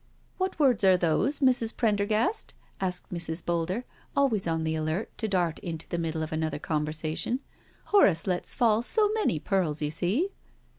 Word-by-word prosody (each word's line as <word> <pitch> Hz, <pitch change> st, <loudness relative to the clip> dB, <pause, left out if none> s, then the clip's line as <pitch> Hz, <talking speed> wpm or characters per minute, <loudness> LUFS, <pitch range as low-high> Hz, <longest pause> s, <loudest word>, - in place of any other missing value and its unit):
" -, -, -37 dB
What 375 Hz, 0 st, -1 dB
words 260 Hz, -9 st, +3 dB
are 190 Hz, -1 st, +6 dB
those, 180 Hz, -, +1 dB
Mrs. 245 Hz, -4 st, +2 dB
Prendergast?" 220 Hz, -, 0 dB, 0.2 s
asked 180 Hz, -1 st, -3 dB
Mrs. 165 Hz, -1 st, -3 dB
Boulder, 175 Hz, +7 st, -1 dB, 0.3 s
always 250 Hz, -10 st, +2 dB
on 160 Hz, -1 st, 0 dB
the 160 Hz, 0 st, -1 dB
alert 155 Hz, +6 st, -2 dB
to 220 Hz, -, -1 dB
dart 175 Hz, -5 st, 0 dB
into 165 Hz, -2 st, -6 dB
the 170 Hz, -, -3 dB
middle 160 Hz, -1 st, -2 dB
of 155 Hz, -, -5 dB
another 155 Hz, -1 st, -1 dB
conversation: 155 Hz, -, -1 dB, 0.5 s
"Horace 195 Hz, -, +4 dB
lets 180 Hz, -2 st, -1 dB
fall 225 Hz, -3 st, +3 dB
so 420 Hz, -, +2 dB
many 430 Hz, -, +1 dB
pearls, 165 Hz, -3 st, 0 dB
you 150 Hz, -1 st, -1 dB
see. 195 Hz, -, 0 dB
180 Hz, 165 wpm, -28 LUFS, 160-235 Hz, 0.5 s, are